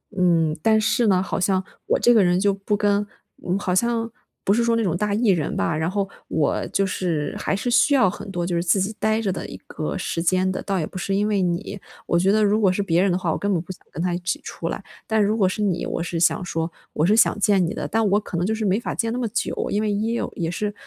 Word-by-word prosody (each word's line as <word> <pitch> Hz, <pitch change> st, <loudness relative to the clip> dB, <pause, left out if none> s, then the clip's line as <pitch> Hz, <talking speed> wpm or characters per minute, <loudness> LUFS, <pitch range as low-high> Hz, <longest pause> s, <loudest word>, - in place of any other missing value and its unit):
嗯， 165 Hz, -4 st, +2 dB
但 220 Hz, +3 st, +4 dB
是 225 Hz, +2 st, +2 dB
呢 185 Hz, -2 st, +3 dB
好 -, -, -3 dB
像 190 Hz, 0 st, +1 dB, 0.2 s
我 -, -, +3 dB
这 240 Hz, -, +5 dB
个 220 Hz, -4 st, +5 dB
人 180 Hz, 0 st, +2 dB
就 200 Hz, +1 st, +2 dB
不 195 Hz, +1 st, -2 dB
跟 205 Hz, 0 st, +1 dB, 0.4 s
嗯， 180 Hz, +2 st, +1 dB
好 185 Hz, -2 st, -1 dB
像 230 Hz, +2 st, 0 dB, 0.3 s
不 195 Hz, -, +3 dB
是 235 Hz, +2 st, +2 dB
说 230 Hz, 0 st, +2 dB
那 230 Hz, -, +1 dB
种 175 Hz, -5 st, 0 dB
大 210 Hz, +3 st, -1 dB
E 225 Hz, 0 st, +2 dB
人 170 Hz, -6 st, +1 dB
吧， 165 Hz, -, 0 dB
然 160 Hz, +2 st, -1 dB
后 200 Hz, 0 st, -1 dB, 0.2 s
我 150 Hz, -, 0 dB
就 195 Hz, -, 0 dB
是 170 Hz, -6 st, -2 dB
还 -, -, -1 dB
是 220 Hz, +5 st, -2 dB
需 255 Hz, +4 st, +4 dB
要 250 Hz, -8 st, +5 dB
很 190 Hz, -, -8 dB
多 175 Hz, -2 st, -2 dB
就 175 Hz, 0 st, -1 dB
是 170 Hz, -, 0 dB
自 180 Hz, +3 st, +2 dB
己 200 Hz, +3 st, -2 dB
呆 220 Hz, 0 st, +1 dB
着 200 Hz, -4 st, 0 dB
的 -, -, -4 dB
一 -, -, -8 dB
个 155 Hz, +4 st, -4 dB
时 170 Hz, -2 st, -2 dB
间 185 Hz, +1 st, +2 dB
的， 185 Hz, -, -3 dB
倒 195 Hz, -1 st, -1 dB
也 160 Hz, -, -1 dB
不 -, -, -9 dB
是 195 Hz, +2 st, -1 dB
因 205 Hz, +1 st, +1 dB
为 205 Hz, -2 st, +1 dB
你， 180 Hz, +3 st, -2 dB, 0.3 s
我 170 Hz, -, +1 dB
觉 190 Hz, +3 st, +3 dB
得 215 Hz, 0 st, +3 dB
如 210 Hz, +1 st, +2 dB
果 195 Hz, -3 st, +4 dB
是 195 Hz, +2 st, -1 dB
别 175 Hz, -2 st, +2 dB
人 195 Hz, 0 st, +2 dB
的 175 Hz, -, +1 dB
话， 175 Hz, -3 st, -1 dB
我 -, -, -1 dB
根 205 Hz, -, -1 dB
本 175 Hz, -, +1 dB
不 180 Hz, -, -8 dB
想 185 Hz, -, -10 dB
跟 160 Hz, -, -5 dB
他 180 Hz, -1 st, 0 dB
一 175 Hz, -, -2 dB
起 180 Hz, 0 st, -2 dB
出 -, -, -5 dB
来， -, -, -5 dB, 0.2 s
但 220 Hz, -1 st, +2 dB
如 210 Hz, +2 st, +1 dB
果 190 Hz, -4 st, +3 dB
是 200 Hz, -, -4 dB
你 180 Hz, -4 st, 0 dB
我 -, -, -3 dB
是 170 Hz, -1 st, -3 dB
想 170 Hz, -, +2 dB
说， 165 Hz, -1 st, -2 dB, 0.2 s
我 150 Hz, -, 0 dB
是 205 Hz, +4 st, +4 dB
想 225 Hz, -, +4 dB
见 195 Hz, -2 st, +3 dB
你 165 Hz, -, -3 dB
的， -, -, -4 dB
但 225 Hz, 0 st, +1 dB
我 205 Hz, +2 st, +3 dB
可 195 Hz, -4 st, -6 dB
能 175 Hz, -, 0 dB
就 215 Hz, -, 0 dB
是 220 Hz, -, -3 dB
没 195 Hz, +2 st, +2 dB
法 -, -, -4 dB
见 230 Hz, -1 st, -1 dB
那 240 Hz, -, -2 dB
么 240 Hz, -, -1 dB
久， 225 Hz, +2 st, -2 dB
因 210 Hz, -, +1 dB
为 215 Hz, -, 0 dB
1 220 Hz, +3 st, -1 dB
哦 -, -, -3 dB
也 165 Hz, -1 st, -2 dB
是 205 Hz, +4 st, -2 dB
195 Hz, 310 characters per minute, -23 LUFS, 175-210 Hz, 0.4 s, 这